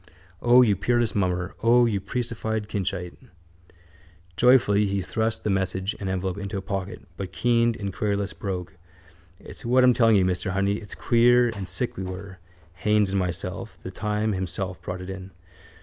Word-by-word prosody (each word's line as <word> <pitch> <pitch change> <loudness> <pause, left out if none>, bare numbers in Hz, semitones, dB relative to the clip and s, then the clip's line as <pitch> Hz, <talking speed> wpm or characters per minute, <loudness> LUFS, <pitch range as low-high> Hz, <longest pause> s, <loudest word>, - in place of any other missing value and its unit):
O, 125 +1 +6
you 105 -4 +3
peerless 120 +3 +1
mummer! 90 -2 -1
O, 120 +1 +5
you 105 -4 0
priestified 110 -2 -3
Kinchite! 95 -3 -4 1.2
Joyfully 105 -3 +4
he 100 0 -1
thrust 110 +4 -2
message 95 0 -1
and 95 - -3
envelope 95 0 -2
into 100 0 -4
a - - -3
pocket 100 +1 -4
but 95 -3 -5
keened 115 +5 +2
in 100 -3 -4
a - - -5
querulous 100 0 -1
brogue: 90 -3 -5 0.7
—It's - - -12
what 125 +2 +4
I'm 125 0 +6
telling 115 -2 +4
you, 95 -2 +4
mister 90 0 -1
honey, 100 +1 +1
it's 105 -2 -9
queer 120 +1 +4
and 100 -5 -6
sick 125 - -3
we 95 - -3
were, 95 0 -7 0.4
Haines 105 -1 +2
and 100 - +1
myself, 90 +2 -3
the 95 - -6
time 105 +2 -1
himself 95 0 -4
brought 90 0 -5
it 90 - -8
in. 95 0 -8
100 Hz, 170 wpm, -25 LUFS, 95-115 Hz, 1.2 s, O